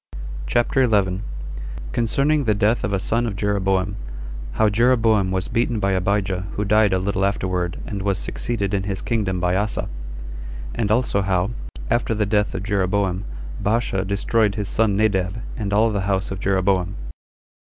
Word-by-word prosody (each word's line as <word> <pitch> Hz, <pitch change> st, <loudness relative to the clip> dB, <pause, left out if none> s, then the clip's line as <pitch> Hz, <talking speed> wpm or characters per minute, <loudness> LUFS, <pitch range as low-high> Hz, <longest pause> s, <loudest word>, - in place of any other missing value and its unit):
CHAPTER 120 Hz, -, +2 dB
11. 100 Hz, -6 st, +2 dB, 0.7 s
Concerning 140 Hz, -, +1 dB
The 105 Hz, -2 st, +3 dB
Death 105 Hz, +4 st, +2 dB
Of -, -, -1 dB
A 100 Hz, -, +2 dB
Son 115 Hz, +5 st, 0 dB
Of 105 Hz, -, -3 dB
Jeroboam. 100 Hz, -1 st, 0 dB, 0.6 s
How 110 Hz, -, +3 dB
Jeroboam 110 Hz, -2 st, +3 dB
Was 95 Hz, -1 st, -1 dB
Beaten 115 Hz, -1 st, 0 dB
By 100 Hz, -1 st, +1 dB
Abijah 95 Hz, 0 st, 0 dB
Who 105 Hz, -, -1 dB
Died 105 Hz, 0 st, +4 dB
A 95 Hz, -, +3 dB
Little 95 Hz, +1 st, 0 dB
Afterward 90 Hz, -3 st, 0 dB
And 100 Hz, -2 st, -4 dB
Was 100 Hz, -1 st, +1 dB
Succeeded 105 Hz, -1 st, -2 dB
In 100 Hz, -, +2 dB
His 100 Hz, -1 st, -3 dB
Kingdom 100 Hz, -6 st, 0 dB
By 90 Hz, +1 st, +1 dB
Asa. 105 Hz, +3 st, -1 dB, 0.8 s
And 110 Hz, -3 st, -1 dB
Also 110 Hz, -3 st, +2 dB
How, 95 Hz, +1 st, +1 dB, 0.4 s
After 120 Hz, -1 st, +1 dB
The 105 Hz, -1 st, +1 dB
Death 105 Hz, 0 st, +1 dB
Of 90 Hz, -, -3 dB
Jeroboam 100 Hz, -1 st, 0 dB, 0.4 s
Baasha 105 Hz, -3 st, +1 dB
Destroyed 100 Hz, +2 st, +1 dB
His 105 Hz, -3 st, -2 dB
Son 105 Hz, -3 st, +2 dB
Nadab 95 Hz, -2 st, +1 dB, 0.2 s
And 105 Hz, -3 st, -3 dB
All 110 Hz, +2 st, +4 dB
The 100 Hz, -2 st, 0 dB
House 95 Hz, -1 st, 0 dB
Of 95 Hz, -, -4 dB
Jeroboam. 95 Hz, -1 st, +1 dB
100 Hz, 160 wpm, -22 LUFS, 95-110 Hz, 0.8 s, Died